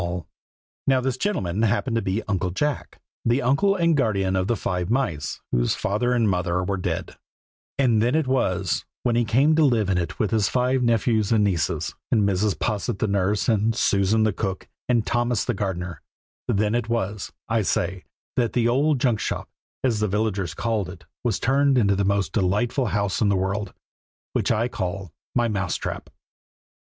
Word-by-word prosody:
Now 135 -1 +4
this 130 0 -1
gentleman 110 - -1
happened 115 +2 +1
to 115 - +1
be 95 +3 -1
Uncle 95 -3 -1
Jack, 145 +10 -2 0.2
the 120 +3 +2
uncle 140 +11 +3
and 170 -3 +3
guardian 100 -8 +1
of 95 0 0
the 120 - +1
Five 90 -2 -2
Mice, 85 - -1
whose - - +1
father 110 +5 0
and 115 -3 +2
mother 90 -1 0
were 100 +2 -1
dead; 90 - -3 0.6
and 120 -6 +3
then 120 +5 +2
it 160 -2 +2
was, 95 -9 0 0.2
when 120 -2 +1
he 120 - +3
came 135 +8 +3
to 160 - +5
live 115 -8 +2
in 90 - +2
it 85 - -4
with 105 - 0
his 110 -2 +2
five 125 +1 +1
nephews 115 -3 +2
and 110 -2 +4
nieces, 90 -8 0 0.2
and 105 -4 +3
Mrs. 100 +1 +1
Posset 105 -3 -1
the 110 - 0
nurse, 100 +1 +1
and 110 0 +2
Susan 100 +2 +2
the 110 -2 +2
cook, 95 -2 -3 0.2
and 120 -3 +2
Thomas 120 -1 0
the 120 - 0
gardener, 90 -3 -4 0.5
then 105 +1 +1
it 120 -1 -1
was, 105 -3 -2 0.2
I 115 -1 +1
say, 90 -1 -1 0.3
that 120 -2 +1
the 120 -1 +2
old 140 +4 +2
Junk 120 -4 +2
shop, - - -3 0.3
as 120 -5 +1
the 105 - +1
villagers 100 -5 -1
called 105 -3 -1
it 90 -1 -11 0.2
was 120 -5 0
turned 135 +1 +3
into 100 -4 +3
the 100 0 0
most 100 -1 0
delightful 115 +6 +1
house 100 0 -1
in 105 - +3
the 100 - +2
world, 100 +1 -2 0.6
which - - +1
I 115 +1 +1
call 95 -6 -4 0.2
my 120 -1 +3
MOUSE 100 -5 -1
TRAP. - - -5
110 Hz, 185 wpm, -24 LUFS, 95-120 Hz, 0.6 s, to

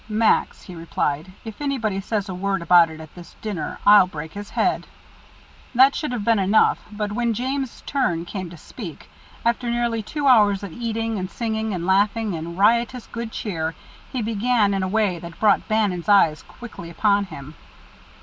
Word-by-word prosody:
"Max," 220 +1 +1
he 185 - -10
replied, 165 -1 -2
"if 220 +4 -8
anybody 225 -9 -1
says 205 0 -2
a 190 - -5
word 195 0 -2
about 170 -1 +6
it 160 0 -10
at 155 -1 -11
this 175 -1 -13
dinner 205 -7 -4
I'll 205 -2 +8
break 160 -2 -7
his 205 0 -7
head." - - 0 0.9
That 265 +3 +6
should 305 -5 -3
have 230 -5 -3
been 230 -2 +3
enough, 195 +3 +3
but 210 0 -3
when 235 +1 0
James' 265 +2 -3
turn 180 -12 0
came 185 -1 -5
to 170 - -11
speak, 175 - -10 0.3
after 235 +1 +1
nearly 235 -1 0
two 290 +7 -4
hours 210 -6 +5
of 195 -5 -7
eating 225 -2 -2
and 185 0 -4
singing 220 0 -2
and 175 -1 -4
laughing 205 +2 +2
and 170 +1 -6
riotous 235 +4 +2
good 230 -1 -5
cheer, 165 -8 -3 0.4
he 250 -3 -2
began 220 -1 +1
in 195 - 0
a 185 - -1
way 200 -3 +1
that 170 0 -10
brought 210 -2 +3
Bannon's 210 -5 0
eyes 165 -6 +5
quickly 220 -8 -11
upon 200 +3 +2
him. 145 -5 -10
205 Hz, 180 wpm, -22 LUFS, 180-230 Hz, 0.9 s, I'll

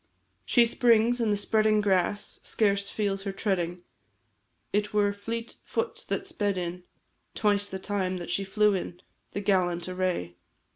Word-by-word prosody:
She 235 - +5
springs, 235 0 +3
and 220 -2 +2
the 205 - +2
spreading 215 +1 +3
grass 205 0 0
Scarce 200 -2 +1
feels 200 -2 -1
her 195 0 -3
treading, 180 -3 -1 0.9
It 210 +1 0
were 205 -1 +3
fleet 230 +3 -5
foot 460 0 -3
that 390 - -2
sped 205 - -1
in 180 0 -4 0.5
Twice 205 -1 +2
the 190 - -4
time 190 -1 -2
that 175 -1 -5
she 195 - +1
flew 210 +2 +3
in. 180 -2 -4 0.3
The 200 - -2
gallant 180 -3 +1
array! 180 - -2
200 Hz, 150 wpm, -28 LUFS, 185-215 Hz, 0.9 s, She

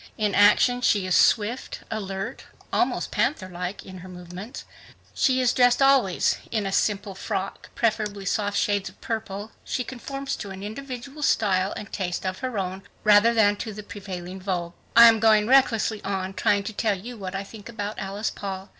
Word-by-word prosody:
In 210 -2 0
action 210 +5 +5
she 205 -5 +2
is 185 - +1
swift, 225 +4 +2
alert, 195 -3 -4 0.3
almost - - 0
panther 205 -11 0
like 180 +2 -5
in 185 -1 -10
her 185 +1 -11
movements. 180 +6 -9 0.9
Dressed 245 -1 +4
always 270 -9 +3
in 210 -4 -1
simple 205 0 0
frocks, 195 0 -4
preferably 210 -3 -1
soft 205 +1 0
shades 205 -2 0
of 185 - -21
purple, 215 -1 -5
she 250 - -2
conforms 275 +2 -5
to 200 - -7
an 190 0 -8
individual 260 +5 -7
style 195 -7 +2
and 210 - -8
taste 180 -2 -3
of 185 0 -3
her 255 -4 -3
own 190 0 -3 0.2
rather 210 +2 +6
than 210 -3 +4
to 220 0 -5
the 210 +1 -8
prevailing 190 -2 -7
vogue. 175 -3 -3 0.2
I 235 0 +10
am 225 -1 +5
going 215 -1 +5
recklessly 230 -4 +3
on 190 -1 -3
to - - -7
try 205 -1 +3
to 200 +2 -6
tell 210 -1 0 0.2
what 190 -2 -6
I 195 - -2
think 205 +2 -11
about 210 -2 -5
Alice 200 +2 -3
Paul. 195 -1 -6
205 Hz, 170 wpm, -25 LUFS, 190-225 Hz, 0.9 s, I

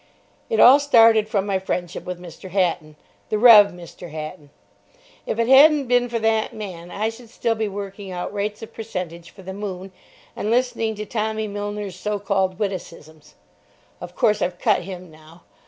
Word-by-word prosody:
It 455 - 0
all 265 +4 +8
started 225 -6 +5
from 200 -3 0
my 195 -2 0
friendship 180 -2 -4
with 180 -1 -6
Mr. 180 +2 -11
Hatton—the 175 +1 -3
Rev. 215 -3 +8
Mr. 175 -1 -11
Hatton. 155 0 -8 0.8
If - - -2
it 230 0 +1
hadn't 290 +4 +7
have 275 -3 -4
been 245 0 +2
for 235 - -2
that 220 -1 0
man 180 -5 -8
I 215 +4 -2
should 230 +1 -12
still 230 0 -1
be 220 -1 -2
working 200 0 -7
out 180 +2 -5
rates 210 +1 -4
of 225 - -10
percentage 180 -6 -6
for 190 - -15
the 190 +1 -7
"Moon" 195 -2 -6 0.4
and 210 - -3
listening 230 -2 0
to 210 +1 -6
Tommy 220 0 -2
Milner's 205 -1 -5
so 210 +1 -2
called 195 -2 -1
witticisms. 170 -6 -7 0.7
Of - - -9
course, 210 -1 +2
I've 180 0 -1
cut - - +1
him 180 -1 -9
now. 155 +2 -18
205 Hz, 175 wpm, -22 LUFS, 180-220 Hz, 0.8 s, all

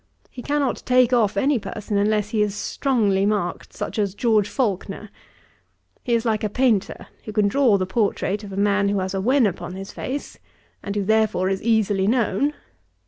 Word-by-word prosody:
He 250 - -8
cannot 285 -1 -1
take 255 -1 +3
off 215 -5 +2
any 270 +4 +2
person 210 0 -5
unless 210 0 +1
he 215 -1 0
is 210 -1 0
strongly 205 -5 0
marked, 200 -4 -1
such - - -5
as 200 -2 -1
George 215 -4 +2
Faulkner. 210 -3 -3 0.9
He 240 -3 +1
is 230 +1 -1
like 220 -2 0
a 210 - 0
painter, 230 -3 0 0.2
who 215 - -6
can 210 -1 +2
draw 240 -1 +3
the 185 - -1
portrait 205 0 -1
of 200 - -8
a 190 - -6
man 200 0 +2
who 200 - 0
has 190 0 -2
a 195 - -1
wen 255 +4 +3
upon 180 -2 -3
his 195 0 -7
face, 280 +2 -6 0.4
and 200 - -5
who, 205 - 0
therefore, 215 -3 +2
is 195 0 -2
easily 210 -4 +1
known. 245 +4 +1
210 Hz, 190 wpm, -22 LUFS, 200-235 Hz, 0.9 s, take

